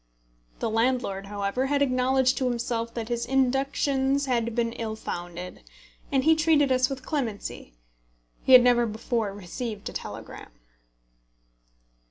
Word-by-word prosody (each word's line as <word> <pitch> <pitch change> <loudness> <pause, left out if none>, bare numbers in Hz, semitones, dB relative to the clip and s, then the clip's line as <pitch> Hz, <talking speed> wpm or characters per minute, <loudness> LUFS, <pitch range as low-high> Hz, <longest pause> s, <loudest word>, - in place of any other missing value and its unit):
The 230 - -2
landlord, 225 -4 0
however, 205 +6 -1
had 285 0 +2
acknowledged 255 0 +2
to 255 -2 +1
himself 235 -1 -2
that 230 -1 -4
his 235 -1 -1
inductions 270 +2 +1
had 235 -3 -1
been 230 -1 0
ill 220 -2 -4
founded, 175 -3 -6 0.5
and 270 -2 +2
he 320 +2 +5
treated 310 -3 +3
us 255 0 +3
with 265 -1 -6
clemency. 225 - -4 0.7
He 260 - +3
had 250 -1 +10
never 240 -1 +4
before 220 0 -2
received 205 +3 -6
a - - -10
telegram. - - -8
245 Hz, 135 wpm, -26 LUFS, 225-265 Hz, 0.7 s, had